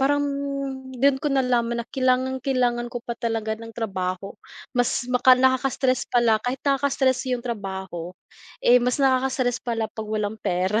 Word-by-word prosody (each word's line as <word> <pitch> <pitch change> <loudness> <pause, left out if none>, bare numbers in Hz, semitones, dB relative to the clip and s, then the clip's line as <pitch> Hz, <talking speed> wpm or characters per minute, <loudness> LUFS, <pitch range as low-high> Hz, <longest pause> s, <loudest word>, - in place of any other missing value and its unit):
parang 285 +2 +2 0.7
do'n 265 +1 +3
ko 295 - 0
nalaman 245 -3 +1
na - - -19
kailangan-kailangan 255 -2 0
ko 245 - -4
pa 235 - -3
talaga 225 -2 -1
ng 230 0 -10
trabaho 190 -4 -3 0.4
mas 245 0 +1
maka 255 +1 +6
nakaka-stress 260 0 +1
pala 230 -3 +3
kahit 250 +2 -1
nakaka-stress 270 -2 +1
yung 245 -1 -2
trabaho, 190 -6 -5 0.6
eh, 245 +1 +6
mas 250 +1 +1
nakaka-stress 260 -2 +1
pala 230 -2 -2
pag 220 -1 -6
walang 215 0 -2
pera. 185 +4 0
245 Hz, 145 wpm, -24 LUFS, 225-260 Hz, 0.7 s, maka